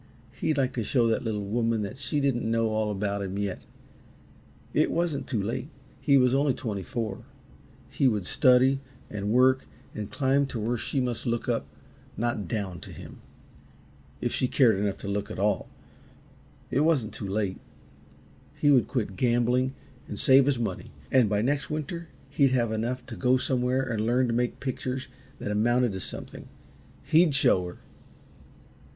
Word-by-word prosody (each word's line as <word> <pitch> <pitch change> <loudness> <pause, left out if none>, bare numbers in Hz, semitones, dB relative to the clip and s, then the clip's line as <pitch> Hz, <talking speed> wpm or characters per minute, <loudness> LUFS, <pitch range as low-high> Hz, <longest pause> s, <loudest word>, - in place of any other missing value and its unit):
He'd 150 +3 -1
like 130 -1 +1
to 120 - -2
show 120 +2 +2
that 115 -1 +1
little 105 -3 -2
woman 115 +1 0
that 105 +6 -6
she 135 +2 -1
didn't 130 -5 0
know 115 0 +2
all 110 0 0
about 100 0 -2
him 95 0 -4
yet. 100 -2 -3 1.1
It - - +3
wasn't 165 -4 -1
too 115 - -1
late 125 +6 -3 0.3
he 140 -2 +4
was 125 -1 +4
only 140 -1 +2
twenty 105 -5 -4
four 110 +3 -4 0.6
he 140 - +1
would 105 -6 0
study, 130 +4 +4 0.3
and 105 -1 -3
work, 130 +3 +4 0.3
and 105 -1 -5
climb 140 +1 +1
to 120 - -5
where 115 +3 0
she 130 +3 -2
must 125 -1 -2
look 120 0 -1
up, - - -1 0.5
not 115 -5 -1
down, 95 -3 -3
to - - -10
him - - -11 1.0
if - - -1
she 130 - +1
cared 125 -5 +4
enough 100 -1 -1
to - - -8
look 100 +1 -2
at - - -6
all. 105 +2 0 1.0
It 130 - +2
wasn't 145 -8 +2
too 100 - -5
late. 100 -1 -1 1.0
He 145 - +3
would 130 -4 +4
quit 110 -7 -2
gambling 125 +3 +1 0.3
and - - -6
save 135 0 +6
his 140 -3 +2
money, 110 -6 -3 0.2
and 125 -5 +4
by 105 0 +1
next 140 +3 0
winter 155 +3 -4 0.2
he'd 140 -2 +3
have 120 -3 +1
enough 120 +3 -2
to 125 - -8
go 130 +1 +3
somewhere 130 0 0
and 110 -4 -2
learn 125 +3 +2
to 120 - -1
make 120 +1 -1
pictures 130 -1 -3 0.3
that 105 - -4
amounted 120 +3 +2
to 95 - -5
something. - - -6 0.6
He'd 160 -2 +4
show 90 -9 +4
her! 90 - -9
120 Hz, 170 wpm, -27 LUFS, 105-130 Hz, 1.1 s, save